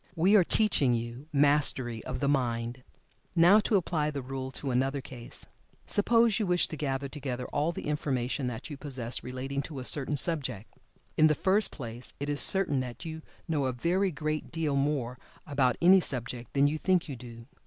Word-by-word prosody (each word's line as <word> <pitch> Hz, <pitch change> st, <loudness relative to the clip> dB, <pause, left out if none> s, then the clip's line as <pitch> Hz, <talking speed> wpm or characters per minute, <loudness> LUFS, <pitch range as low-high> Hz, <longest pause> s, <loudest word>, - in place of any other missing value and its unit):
We 185 Hz, +5 st, +4 dB
are 195 Hz, -, +7 dB
teaching 165 Hz, -, +2 dB
you 120 Hz, +5 st, -5 dB
Mastery 140 Hz, -5 st, +3 dB
of -, -, -4 dB
the 140 Hz, -, +1 dB
Mind. 120 Hz, -2 st, -1 dB, 0.5 s
Now 175 Hz, +5 st, +7 dB
to 215 Hz, 0 st, +1 dB
apply 160 Hz, -5 st, +1 dB
the 140 Hz, -3 st, -5 dB
rule 130 Hz, 0 st, -5 dB
to 135 Hz, -1 st, -4 dB
another 135 Hz, +3 st, 0 dB
case. 125 Hz, -3 st, -8 dB, 0.4 s
Suppose 230 Hz, +1 st, +3 dB
you 210 Hz, -, 0 dB
wish 180 Hz, 0 st, +3 dB
to -, -, -5 dB
gather 140 Hz, -2 st, -2 dB
together 130 Hz, -3 st, -5 dB
all 150 Hz, +3 st, 0 dB
the -, -, -7 dB
information 135 Hz, -3 st, -1 dB
that 120 Hz, -2 st, -5 dB
you 145 Hz, -, -6 dB
possess 130 Hz, -5 st, -4 dB
relating 130 Hz, +2 st, -4 dB
to 145 Hz, 0 st, -7 dB
a 130 Hz, -, -5 dB
certain 145 Hz, +1 st, +1 dB
subject. 130 Hz, -, 0 dB, 0.4 s
In 155 Hz, -, +6 dB
the 155 Hz, -, +2 dB
first 195 Hz, +6 st, +2 dB
place 120 Hz, -2 st, -7 dB
it 145 Hz, +1 st, -3 dB
is 145 Hz, -1 st, -1 dB
certain 185 Hz, -8 st, +2 dB
that 125 Hz, +2 st, -6 dB
you 160 Hz, -1 st, -6 dB, 0.3 s
know 150 Hz, -4 st, 0 dB
a 130 Hz, -, -1 dB
very 180 Hz, +9 st, +1 dB
great 155 Hz, -1 st, -3 dB
deal 155 Hz, -3 st, -1 dB
more 135 Hz, -3 st, -1 dB, 0.3 s
about 135 Hz, -5 st, +1 dB
any 190 Hz, +2 st, +8 dB
subject 120 Hz, -6 st, -4 dB
than 140 Hz, 0 st, +4 dB
you 150 Hz, +2 st, 0 dB
think 185 Hz, -1 st, +1 dB
you 140 Hz, -, -5 dB
do. 115 Hz, -2 st, -11 dB
140 Hz, 190 wpm, -29 LUFS, 125-160 Hz, 0.5 s, any